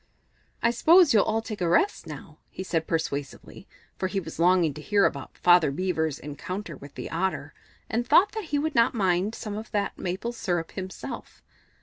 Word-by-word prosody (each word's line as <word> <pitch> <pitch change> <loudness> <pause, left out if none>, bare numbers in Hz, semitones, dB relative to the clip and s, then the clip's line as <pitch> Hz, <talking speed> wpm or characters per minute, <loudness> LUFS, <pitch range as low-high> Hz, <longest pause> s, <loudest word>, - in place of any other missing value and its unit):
"I 235 - +4
s'pose 325 +5 +6
you'll 210 - +5
all 220 +1 0
take 215 -4 -6
a 175 - +1
rest 390 - +2
now," - - -10
he 190 - -7
said 165 -3 -1
persuasively, 145 -4 -4 0.3
for 185 - 0
he 195 +1 -2
was 165 -3 -9
longing 175 -3 +4
to 150 - -9
hear 200 +4 +3
about - - -3
Father 175 -4 +5
Beaver's 160 -1 -1
encounter 180 +8 -6
with 140 0 -13
the - - -6
Otter, 185 +3 -2 0.3
and 235 +2 -1
thought 360 +7 +5
that 440 -3 -5
he 295 -2 -1
would 310 +2 -1
not 235 +1 +3
mind 190 0 +1
trying - - -8
some 210 -2 -5
of 220 +1 -7
that 205 -1 -2
maple 190 +6 -3
syrup 175 -8 -2
himself. 190 -1 -8
190 Hz, 195 wpm, -26 LUFS, 165-225 Hz, 0.3 s, s'pose